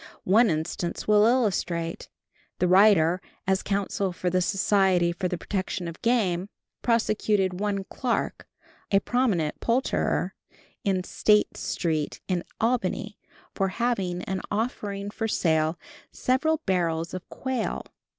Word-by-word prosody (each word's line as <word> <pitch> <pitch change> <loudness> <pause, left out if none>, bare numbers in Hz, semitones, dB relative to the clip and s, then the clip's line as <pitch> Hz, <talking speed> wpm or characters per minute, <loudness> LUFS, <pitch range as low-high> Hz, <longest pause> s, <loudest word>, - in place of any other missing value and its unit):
One 220 +5 +5
instance 165 +2 -3
will 210 0 +6
illustrate. 180 -9 0 0.5
The 180 - +2
writer, 185 -2 +5 0.2
as 190 0 +2
counsel 200 -1 -1
for 180 0 -2
the 185 +1 +2
Society 190 -3 +2
for 180 +2 -2
the 180 - -3
Protection 185 -1 -3
of 170 - -8
Game, 200 -6 +1 0.3
prosecuted 215 -5 +1
one 200 -1 -1
Clark, 240 +4 -2 0.4
a 195 - +5
prominent 200 -11 0
poulterer 245 +3 0 0.5
in 190 -4 +1
State 210 +3 +2
street 155 -4 -2
in 180 -2 0 0.2
Albany, 215 -3 -1 0.3
for 195 - 0
having 190 -4 -1
and 190 -1 -3
offering 205 -2 -3
for 225 +1 -2
sale 160 -4 +1 0.3
several 310 +5 +1
barrels 170 -3 0
of 185 -1 -7
quail. 260 -3 -3
195 Hz, 120 wpm, -26 LUFS, 175-215 Hz, 0.5 s, will